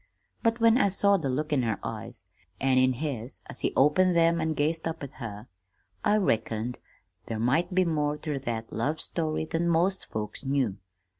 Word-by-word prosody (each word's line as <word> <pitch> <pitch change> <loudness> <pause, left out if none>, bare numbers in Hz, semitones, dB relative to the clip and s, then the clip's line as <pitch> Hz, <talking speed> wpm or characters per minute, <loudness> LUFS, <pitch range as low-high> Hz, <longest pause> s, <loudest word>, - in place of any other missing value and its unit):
But 230 +1 +1
when 230 +2 +5
I 200 - +4
saw 200 +1 +4
the 150 -7 -2
look 150 +4 -1
in 135 - +3
her 110 -4 0
eyes, - - -7 0.3
an' 130 -1 +3
in 130 0 +4
his 130 -3 -5
as - - -7
he - - 0
opened 170 +6 +4
them 170 0 +4
an' 160 0 0
gazed 160 +2 0
up 160 -2 -5
at 140 - -6
her, 105 -2 -6 0.6
I 210 - +4
reckoned 115 - 0 0.5
there 115 - -3
might 130 - +1
be 185 -1 +4
more 150 -3 0
ter 150 -3 -3
that 115 -3 -4
love 145 +8 -1
story 155 -2 -2
than 165 +2 0
most 175 +4 +2
folks 105 +2 -5
knew. 135 -7 0
150 Hz, 190 wpm, -28 LUFS, 125-170 Hz, 0.6 s, when